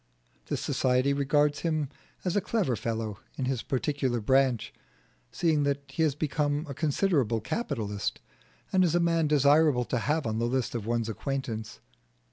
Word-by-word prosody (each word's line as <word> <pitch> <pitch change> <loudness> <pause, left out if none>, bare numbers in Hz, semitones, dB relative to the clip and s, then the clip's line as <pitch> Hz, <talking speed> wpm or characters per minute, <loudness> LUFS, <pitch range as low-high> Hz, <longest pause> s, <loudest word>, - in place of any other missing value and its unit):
This - - -2
society 130 +2 +2
regards 145 +1 +2
him 155 -3 0 0.4
as 180 - 0
a 205 - +3
clever 185 - 0
fellow 110 -2 -3 0.2
in 130 - -1
his 130 -2 -1
particular 135 -2 -1
branch, 130 0 +2 0.6
seeing 160 -3 +1
that 140 0 0
he 135 - -3
has 155 -4 +2
become 145 0 0
a 140 - -5
considerable 140 - +1
capitalist, 105 - -3 0.5
and 185 -1 +5
as 170 -2 +2
a - - +4
man 165 -2 +2
desirable 145 -2 +4
to 125 - -1
have 150 +6 0
on 110 0 -1
the 120 - +1
list 130 0 -1
of 115 -3 -4
one's 115 -1 0
acquaintance. 110 - -4
140 Hz, 160 wpm, -28 LUFS, 120-155 Hz, 0.6 s, and